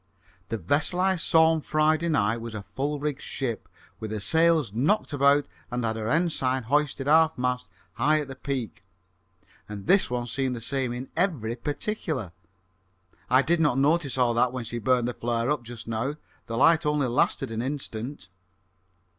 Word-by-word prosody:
"The 115 - -2
vessel 145 - 0
I 190 +1 +3
saw 160 -1 +4
on 160 -1 0
Friday 155 +2 +1
night 115 -7 +2
was 115 -1 -7
a 100 - -5
full 145 +2 -2
rigged 145 -1 -3
ship, 120 -6 -4 0.3
with 110 - -5
her 110 0 -3
sails 160 -1 +2
knocked 150 - +1
about 140 +1 +3 0.2
and 125 -1 -2
had 110 -1 -1
her 110 0 -3
ensign 135 -5 +1
hoisted 145 +2 0
half 160 +2 +4
mast 125 0 -1 0.2
high 150 +6 +2
at 145 - -6
the 135 - -8
peak, 130 -4 -4 0.9
and 100 -2 -7
this 195 - +4
one 120 -1 -2
seemed 130 +1 -1
the - - -5
same 130 +1 -1
in 125 +2 -6
every 155 - 0
particular. 145 - -3 1.0
I 130 +2 +5
did 170 +3 +2
not 150 -5 +2
notice 145 0 +2
all 125 -2 +3
that 120 +1 +2
when 130 -1 -4
she 120 +1 -4
burnt 125 +1 +2
the 125 - -2
flare 120 +2 -1
up 150 - 0
just 120 -1 -9
now. 115 +6 -2 0.3
The 115 - -3
light 165 +5 +5
only 150 -2 +1
lasted 120 -2 0
an 115 0 -2
instant." 130 -4 -5
135 Hz, 180 wpm, -26 LUFS, 120-150 Hz, 1.0 s, I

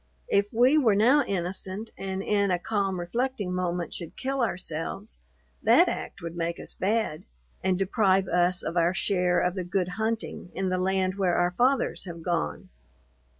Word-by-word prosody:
If 200 0 +3
we 250 +6 +5
were 225 -8 +4
now 250 +8 +5
innocent, 190 +3 -3
and 190 0 -4
in 200 -1 +1
a 180 - +2
calm 195 0 -1
reflecting 210 +1 -2
moment 175 -2 -2
should 170 -3 -7
kill 270 0 -2
ourselves, 190 -1 -3 0.4
that - - +6
act - - -5
would 170 0 -5
make 170 0 -2
us - - -5
bad, 210 -5 -1 0.4
and 185 -1 +2
deprive 195 -1 +2
us 180 +1 +2
of 170 - -4
our 170 +1 +2
share 180 -3 +2
of 180 - +1
the 185 -1 -3
good 180 +1 -1
hunting 220 -2 -3
in 190 -1 -1
the 185 0 0
land 190 0 0
where 180 -3 +2
our 175 0 +2
fathers 255 +6 +1
have 170 -2 -8
gone! 170 - -2
190 Hz, 170 wpm, -27 LUFS, 175-210 Hz, 0.4 s, that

